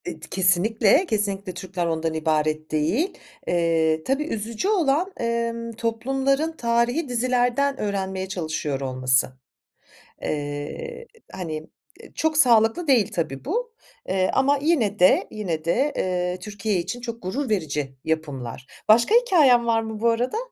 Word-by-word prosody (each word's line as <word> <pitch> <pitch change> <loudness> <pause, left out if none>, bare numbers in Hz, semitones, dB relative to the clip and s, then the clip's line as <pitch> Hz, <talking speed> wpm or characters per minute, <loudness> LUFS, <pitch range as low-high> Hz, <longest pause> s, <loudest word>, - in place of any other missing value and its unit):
Eee, 160 - -6
d 165 - -10
kesinlikle, 200 - +3
kesinlikle 200 - -2
Türkler 180 0 -4
ondan 165 -1 -1
ibaret 155 -1 0
değil. 160 - 0 0.3
Eee, 165 -2 +1
tabii, 270 - 0
üzücü 225 - -3
olan, 350 -2 +2
emm, 230 0 -2
toplumların 270 +7 0
tarihî 240 +6 +1
dizilerden 250 +3 +1
öğrenmeye 190 -2 -2
çalışıyor 155 -6 -3
olması. 130 -1 +1 0.9
Eee, 150 - -5 0.2
hani, 165 -4 -4 0.5
ııı, - - -15
çok 315 -1 0
sağlıklı 240 +4 +4
değil 240 -8 +3
tabii 155 -5 -3
bu, 465 - -2 0.4
eee, 185 0 +1
ama 280 +2 +3
yine 260 -10 +1
de, 180 +1 +5
yine 170 -7 -4
de, 265 - +1
eee, 180 0 -1
Türkiye 205 +1 -3
için 185 +8 -4
çok 235 -1 -6
gurur 245 +9 -2
verici 150 -9 -2
yapımlar. 135 -6 -4 0.2
Başka 235 - +5
hikâyen 310 - +5
var 230 -1 +2
mı 220 -1 -6
bu 235 +2 +3
arada? 245 - 0
215 Hz, 135 wpm, -24 LUFS, 165-255 Hz, 0.9 s, de